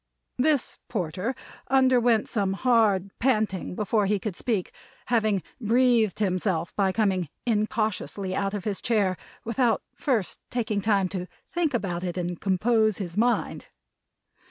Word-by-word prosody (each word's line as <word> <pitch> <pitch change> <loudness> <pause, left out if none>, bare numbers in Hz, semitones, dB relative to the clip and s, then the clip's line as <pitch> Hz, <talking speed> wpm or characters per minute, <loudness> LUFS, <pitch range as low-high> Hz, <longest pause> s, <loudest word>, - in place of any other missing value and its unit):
This 290 0 +1
Porter 190 +4 -2 0.3
underwent 245 -4 +4
some 200 -3 0
hard 205 -4 +2
panting 215 -8 0
before 210 0 +1
he 205 +1 +2
could 200 -1 -4
speak; 210 -5 -1 0.4
having 215 -5 +2 0.2
breathed 235 -2 +3
himself 185 -4 -1
by 195 -2 +2
coming 190 -6 0 0.2
incautiously 215 -3 -1
out 200 0 -1
of 200 - -4
his 205 -2 -2
chair, 205 -5 +2 0.3
without 230 -1 +1
first 235 -10 -1
taking 220 -4 -1
time 200 -3 +2
to 180 -1 -4 0.2
think 330 -6 0
about 180 -6 -2
it 180 -1 -3
and 175 -1 -3
compose 215 +2 +2
his 180 -4 -5
mind. 240 +3 0
210 Hz, 130 wpm, -26 LUFS, 190-235 Hz, 0.4 s, underwent